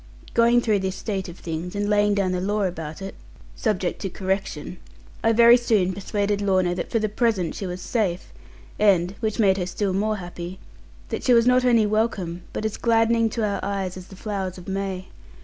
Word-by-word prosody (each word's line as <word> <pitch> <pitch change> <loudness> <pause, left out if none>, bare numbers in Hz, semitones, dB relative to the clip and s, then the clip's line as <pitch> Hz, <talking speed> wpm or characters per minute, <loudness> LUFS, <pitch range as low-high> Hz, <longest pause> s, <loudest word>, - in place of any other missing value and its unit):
Going 235 +1 +4
through 215 -4 +2
this 190 0 -2
state 195 -4 -4
of 175 - -10
things, 170 +3 -5
and 205 0 -1
laying 205 0 +3
down 195 -2 +1
the 180 -1 -1
law 205 +2 0
about 165 -1 -4
it 195 - -6 0.4
(subject 180 - -1
to 195 - -2
correction), 190 -3 -3 0.5
I 225 - +4
very 235 +1 +7
soon 210 -6 +1
persuaded 200 +1 -1
Lorna 185 -3 +2
that 175 - -4
for 230 - +1
the 215 -1 +1
present 210 -5 0
she 195 - -5
was 180 0 -5
safe, 190 -6 -2 0.5
and 185 -4 +4
(which 220 -2 -2
made 195 -3 +4
her 180 -2 -2
still 195 +1 -1
more 215 +3 0
happy) 175 -1 -7 0.5
that - - -4
she 250 - +5
was 230 0 +5
not 250 0 +4
only 230 -3 +4
welcome, 205 -5 -1
but 215 - -4
as 215 - -2
gladdening 230 0 +3
to 220 0 -1
our 200 -1 -1
eyes 195 -2 -2
as 185 0 -9
the 190 - -12
flowers 190 -2 -4
of 180 - -11
May. 190 -1 -3
200 Hz, 200 wpm, -24 LUFS, 185-215 Hz, 0.5 s, very